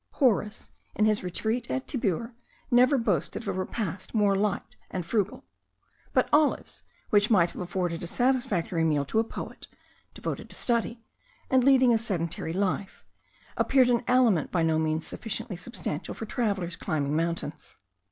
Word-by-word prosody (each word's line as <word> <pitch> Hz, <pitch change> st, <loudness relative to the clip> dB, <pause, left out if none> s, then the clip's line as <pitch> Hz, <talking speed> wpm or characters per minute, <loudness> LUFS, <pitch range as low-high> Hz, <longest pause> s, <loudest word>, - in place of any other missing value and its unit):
Horace, 220 Hz, -6 st, +1 dB, 0.2 s
in 215 Hz, -, +3 dB
his 215 Hz, -2 st, +2 dB
retreat 220 Hz, +7 st, -2 dB
at 265 Hz, -, -2 dB
Tibur, 230 Hz, -, -1 dB, 0.4 s
never 250 Hz, +3 st, +5 dB
boasted 230 Hz, -1 st, -1 dB
of -, -, -10 dB
a -, -, 0 dB
repast 185 Hz, +2 st, -4 dB
more 205 Hz, -2 st, +3 dB
light 205 Hz, 0 st, -1 dB
and 180 Hz, -3 st, -4 dB
frugal; 205 Hz, +1 st, -1 dB, 0.7 s
but -, -, +3 dB
olives, 300 Hz, 0 st, +2 dB, 0.3 s
which 205 Hz, 0 st, +4 dB
might 180 Hz, -6 st, +4 dB
have -, -, -7 dB
afforded 175 Hz, -1 st, -2 dB
a 175 Hz, -, -4 dB
satisfactory 240 Hz, -8 st, +1 dB
meal 150 Hz, -3 st, +2 dB
to 220 Hz, -, 0 dB
a -, -, +4 dB
poet, 225 Hz, -, -8 dB, 0.5 s
devoted -, -, -5 dB
to -, -, -9 dB
study, 230 Hz, -1 st, -1 dB, 0.5 s
and 260 Hz, -1 st, +5 dB
leading 260 Hz, -2 st, +6 dB
a 225 Hz, -, +3 dB
sedentary 170 Hz, -7 st, -2 dB
life, 190 Hz, +1 st, -2 dB, 0.5 s
appeared 255 Hz, -2 st, +4 dB
an 235 Hz, 0 st, +2 dB
aliment 240 Hz, -, +3 dB
by 170 Hz, -3 st, +1 dB
no 160 Hz, -1 st, +2 dB
means 155 Hz, 0 st, 0 dB
sufficiently 225 Hz, -2 st, -4 dB
substantial 180 Hz, -4 st, -4 dB
for 225 Hz, -, -5 dB
travellers 200 Hz, -7 st, -1 dB
climbing 150 Hz, -5 st, -1 dB
mountains. 165 Hz, -1 st, -3 dB
205 Hz, 155 wpm, -27 LUFS, 170-235 Hz, 0.7 s, leading